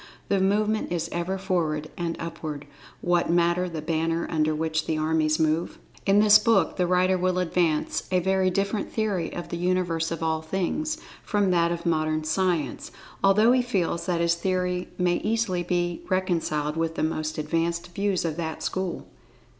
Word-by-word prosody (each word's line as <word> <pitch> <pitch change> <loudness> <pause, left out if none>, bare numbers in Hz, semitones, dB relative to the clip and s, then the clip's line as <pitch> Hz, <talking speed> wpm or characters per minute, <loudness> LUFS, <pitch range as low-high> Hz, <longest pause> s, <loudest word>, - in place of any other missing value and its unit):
The 200 - +2
movement 210 +2 +1
is 170 -2 -2
ever 175 +3 -2
forward, 165 -6 -1
and 170 -1 -2
upward—what 165 +2 -3
matter 175 +1 +2
the 160 -3 -5
banner 165 +1 0
under 155 -1 +1
which 160 0 -1
the 160 - 0
armies 155 0 +1
move? 160 +1 0 0.3
In 195 +1 +5
this 210 0 +7
book 210 -6 +2
the 180 - +1
writer 185 +1 +2
will 185 0 +1
advance 170 -3 0
a 185 - +3
very 190 +1 +2
different 200 +2 -1
theory 205 -7 -1
of 175 - -6
the 170 - -3
Universe 175 -2 0
of 165 -1 -4
All 160 -1 0
Things 195 - -2 0.3
from 205 -3 +1
that 170 -1 +3
of 170 0 -4
Modern 155 -2 +1
Science, 170 0 -1 0.3
although 210 +4 +5
he 255 0 +4
feels 180 -8 -1
that 175 -2 +1
his 170 0 +3
theory 180 +1 -1
may 180 -1 +2
easily 215 -4 0
be 175 -1 -1
reconciled 165 -5 0
with 165 0 -1
the - - -1
most 155 0 -2
advanced 165 +3 -2
views 195 -1 0
of 160 -1 -2
that 160 -2 -4
school. 185 -2 -3
175 Hz, 170 wpm, -26 LUFS, 160-185 Hz, 0.3 s, this